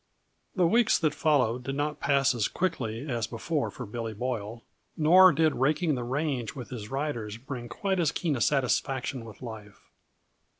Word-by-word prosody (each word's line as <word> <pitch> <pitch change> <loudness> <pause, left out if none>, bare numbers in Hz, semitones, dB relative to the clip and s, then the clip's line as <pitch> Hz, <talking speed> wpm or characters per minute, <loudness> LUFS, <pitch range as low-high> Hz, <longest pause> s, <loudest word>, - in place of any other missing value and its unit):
_ - - -39
The 185 -3 +3
weeks 230 +6 +4
that 155 -3 +1
followed 125 -7 +1
did 135 +2 -3
not 150 +1 -2
pass 140 -2 +3
as 115 -4 0
quickly 135 -8 -2
as 120 -5 -1
before 145 +6 -2
for 125 - -7
Billy 115 +1 -5
Boyle, 115 -1 -4 0.3
nor 180 +4 +7
did 160 -1 +2
raking 155 +5 +1
the 125 -2 -2
range 135 -1 -2
with 125 -1 -8
his 110 -4 -6
riders 125 -7 -3
bring 120 -1 -7
quite 190 +6 -1
as 160 -4 +2
keen 160 -2 -1
a 120 - -3
satisfaction 130 -2 0
with 110 +1 -12
life. 110 -4 -10
135 Hz, 175 wpm, -28 LUFS, 115-155 Hz, 0.3 s, nor